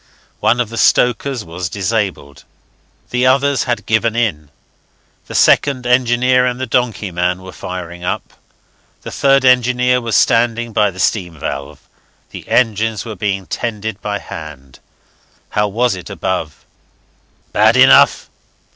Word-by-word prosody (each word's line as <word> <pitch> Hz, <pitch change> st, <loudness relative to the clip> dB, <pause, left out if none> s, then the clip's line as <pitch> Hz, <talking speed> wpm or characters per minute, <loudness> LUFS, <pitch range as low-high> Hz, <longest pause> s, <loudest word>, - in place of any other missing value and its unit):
One 110 Hz, +3 st, +2 dB
of 120 Hz, -3 st, -1 dB
the 115 Hz, -, -5 dB
stokers 125 Hz, 0 st, +1 dB
was 85 Hz, +2 st, -5 dB
disabled, 95 Hz, -8 st, -3 dB, 0.7 s
the 125 Hz, +1 st, +1 dB
others 140 Hz, +1 st, +2 dB
had 120 Hz, -1 st, -2 dB
given 110 Hz, +1 st, +1 dB
in, 90 Hz, -12 st, -1 dB, 0.8 s
the -, -, -8 dB
second 135 Hz, -3 st, +3 dB
engineer 125 Hz, +1 st, +2 dB
and 125 Hz, 0 st, -1 dB
the 130 Hz, -, -2 dB
donkey 115 Hz, -5 st, -1 dB
man 90 Hz, +1 st, -1 dB
were 95 Hz, -, -9 dB
firing 90 Hz, -1 st, -7 dB
up. 90 Hz, -, -4 dB, 0.7 s
The -, -, -7 dB
third 135 Hz, -1 st, +2 dB
engineer 125 Hz, 0 st, +3 dB
was 115 Hz, -2 st, -2 dB
standing 115 Hz, 0 st, +2 dB
by 105 Hz, -, +2 dB
the 95 Hz, -1 st, -11 dB
steam 90 Hz, -5 st, -1 dB
valve. 70 Hz, -1 st, -6 dB, 0.4 s
The -, -, -10 dB
engines 110 Hz, -2 st, 0 dB
were 110 Hz, -2 st, -6 dB
being 95 Hz, 0 st, -2 dB
tended 110 Hz, -2 st, -4 dB
by 105 Hz, -1 st, -3 dB
hand. 75 Hz, -8 st, -10 dB, 0.7 s
How 105 Hz, 0 st, 0 dB
was 120 Hz, +4 st, 0 dB
it 90 Hz, -2 st, -8 dB
above? 80 Hz, -6 st, -4 dB, 0.9 s
"Bad -, -, +4 dB
enough. -, -, +5 dB
110 Hz, 140 wpm, -16 LUFS, 90-125 Hz, 0.9 s, enough